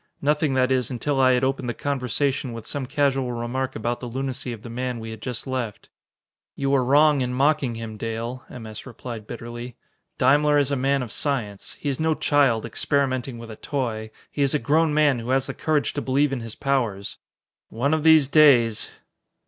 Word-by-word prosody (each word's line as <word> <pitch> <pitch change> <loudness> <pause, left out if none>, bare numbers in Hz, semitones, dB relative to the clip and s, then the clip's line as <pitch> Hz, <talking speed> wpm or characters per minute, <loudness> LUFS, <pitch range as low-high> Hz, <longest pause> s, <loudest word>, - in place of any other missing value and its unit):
Nothing, 150 -1 +1
that 130 0 +2
is, 130 -3 +1
until 135 +3 -1
I 130 -1 +5
had 125 +1 +1
opened 130 -1 0
the 120 - -3
conversation 135 -1 -1
with 115 -1 -8
some 135 0 -4
casual 135 -3 +1
remark 125 +3 -3
about 120 +2 -2
the 125 - -6
lunacy 130 0 -3
of 115 -2 -8
the 120 - -8
man 125 0 -3
we 115 0 -7
had 110 -1 -9
just 125 -3 -5
left. 130 -5 -4 0.7
"You 140 0 0
are 135 -2 +4
wrong 145 +2 +4
in 125 0 -1
mocking 140 -2 +2
him, 115 -1 -6
Dale," 115 +3 -4
M. 120 -3 -9
S. 110 +3 -9
replied 115 -3 -8
bitterly. 120 +1 -7 0.4
"Daimler 145 +3 +4
is 145 -1 +2
a - - +2
man 135 0 +1
of 120 - -7
science. 115 -9 -3
He - - -5
is 135 -2 -1
no 160 0 +2
child, 135 -8 +2
experimenting 130 -1 0
with 115 -1 -9
a - - -8
toy; 115 -6 -3 0.2
he 145 - -3
is 140 +1 +2
a - - +5
grown 155 +2 +2
man 145 -4 +3
who 115 +2 -6
has 130 0 +2
the 135 - -4
courage 155 0 0
to 145 - -2
believe 135 +2 +1
in 135 - -2
his 115 -1 -7
powers. 120 -8 -1 0.5
One 140 +7 0
of 160 - +1
these 160 -3 +6
days...." 130 -7 +5
130 Hz, 205 wpm, -24 LUFS, 120-140 Hz, 0.7 s, these